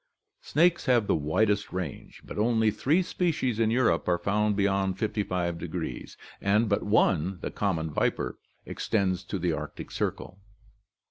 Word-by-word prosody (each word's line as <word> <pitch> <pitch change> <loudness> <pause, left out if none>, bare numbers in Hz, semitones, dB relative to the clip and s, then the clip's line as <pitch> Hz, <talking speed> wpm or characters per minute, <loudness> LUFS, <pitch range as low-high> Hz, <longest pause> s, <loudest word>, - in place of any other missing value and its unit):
Snakes 175 - +2
have 120 -4 +4
the - - +2
widest 100 +7 +1
range, 90 -6 -6
but - - -6
only 110 0 +3
three 155 - +2
species 155 - -1
in 110 -1 +3
Europe 115 -8 +2
are 90 -1 +3
found 105 +2 +1
beyond 95 -2 +1
55° 90 -5 -3 0.2
and 105 +3 +3
but 100 -1 +1
one, 95 -3 +2
the - - -4
common 80 -6 -1
viper, - - -1 0.3
extends 95 -3 -1
to 100 - -4
the 90 -2 0
Arctic - - -6
Circle. 95 - -3
100 Hz, 140 wpm, -28 LUFS, 90-110 Hz, 0.3 s, have